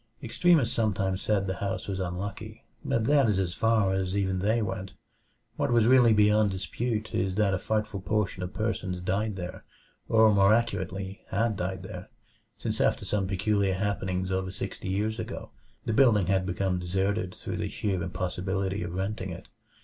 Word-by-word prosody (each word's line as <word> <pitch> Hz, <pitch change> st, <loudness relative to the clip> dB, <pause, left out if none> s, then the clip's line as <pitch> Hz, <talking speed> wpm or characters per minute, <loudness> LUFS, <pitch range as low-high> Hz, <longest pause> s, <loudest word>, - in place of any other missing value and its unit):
Extremists 130 Hz, +1 st, +3 dB
sometimes 100 Hz, -5 st, 0 dB
said 100 Hz, -2 st, +1 dB
the 95 Hz, -1 st, -3 dB
house 100 Hz, -1 st, -3 dB
was 95 Hz, -1 st, -3 dB
"unlucky," 95 Hz, +2 st, -5 dB, 0.2 s
but 115 Hz, -1 st, 0 dB
that 140 Hz, -3 st, +4 dB
is 100 Hz, -, +2 dB
as 90 Hz, -3 st, 0 dB
far 110 Hz, -2 st, +2 dB
as 95 Hz, 0 st, -1 dB
even 95 Hz, -2 st, 0 dB
they 110 Hz, +5 st, +2 dB
went. 95 Hz, -2 st, -4 dB, 0.6 s
What -, -, 0 dB
was 115 Hz, -2 st, +4 dB
really 125 Hz, -1 st, +6 dB
beyond 105 Hz, 0 st, +4 dB
dispute 105 Hz, +4 st, -3 dB
is 95 Hz, 0 st, 0 dB
that 105 Hz, -2 st, +2 dB
a 95 Hz, -, 0 dB
frightful 105 Hz, -1 st, -1 dB
proportion 105 Hz, -2 st, -1 dB
of 90 Hz, 0 st, -4 dB
persons 100 Hz, -4 st, -2 dB
died 100 Hz, +4 st, -1 dB
there; 90 Hz, -2 st, -6 dB, 0.5 s
or 110 Hz, -1 st, +6 dB
more 100 Hz, +2 st, +5 dB
accurately, 100 Hz, -4 st, -2 dB
had 110 Hz, +2 st, +1 dB
died 95 Hz, +1 st, -3 dB
there, 95 Hz, +1 st, -8 dB, 0.5 s
since 110 Hz, -1 st, -2 dB
after -, -, +1 dB
some 95 Hz, 0 st, 0 dB
peculiar 100 Hz, 0 st, +1 dB
happenings 95 Hz, -1 st, -1 dB
over 95 Hz, 0 st, -1 dB
sixty 95 Hz, -, -5 dB
years 105 Hz, +4 st, -1 dB
ago 110 Hz, -, -6 dB, 0.3 s
the 110 Hz, -, 0 dB
building 110 Hz, -6 st, +5 dB
had 95 Hz, 0 st, +1 dB
become 90 Hz, 0 st, 0 dB
deserted 95 Hz, +2 st, -1 dB
through -, -, -5 dB
the -, -, -2 dB
sheer 95 Hz, -4 st, -2 dB
impossibility 95 Hz, +2 st, -2 dB
of 85 Hz, 0 st, -4 dB
renting 95 Hz, 0 st, -3 dB
it. 85 Hz, -, -8 dB
100 Hz, 170 wpm, -28 LUFS, 95-110 Hz, 0.6 s, really